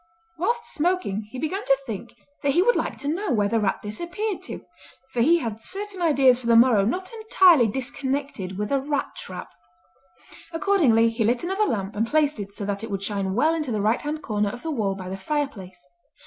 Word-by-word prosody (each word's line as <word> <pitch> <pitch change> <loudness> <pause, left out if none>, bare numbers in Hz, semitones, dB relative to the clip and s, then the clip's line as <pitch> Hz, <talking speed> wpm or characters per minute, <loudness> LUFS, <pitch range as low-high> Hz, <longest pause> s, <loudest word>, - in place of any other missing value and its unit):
Whilst 470 +8 -1
smoking 330 - -1
he 260 - -8
began 340 +9 -2
to 275 - +3
think 230 0 -7 0.3
that 280 -1 +1
he 350 - +4
would 485 +4 +4
like - - -2
to 285 - -6
know 340 +4 -1
where 210 -4 +2
the 225 +2 +1
rat 205 -2 -1
disappeared 345 - -4
to, - - -8 0.5
for 245 - 0
he 330 +8 +5
had 225 -8 -4
certain 395 - -6
ideas 275 -6 +4
for 240 - -7
the 230 - +5
morrow 230 -3 +6
not 370 - -2
entirely 375 - +5
disconnected 265 -5 -3
with 210 +3 -3
a 275 -1 +2
rat 285 0 -2
trap. 185 - -8 1.0
Accordingly 330 - +3
he 225 0 -1
lit 240 +6 +1
another 385 +4 +1
lamp 200 - -2
and 220 +2 0
placed 300 -2 +2
it 200 -1 -6
so 200 0 -5
that 200 +1 -3
it 225 - -5
would 195 -1 -3
shine 195 -2 -2
well 310 +7 +3
into 305 -6 -2
the 215 - -1
right 215 +4 +1
hand 305 +1 -4
corner 210 -2 0
of 245 +4 -8
the 325 - -2
wall 210 -8 -1
by 185 -1 -7
the 190 +1 -5
fireplace. 195 -7 -4
255 Hz, 210 wpm, -24 LUFS, 210-330 Hz, 1.0 s, morrow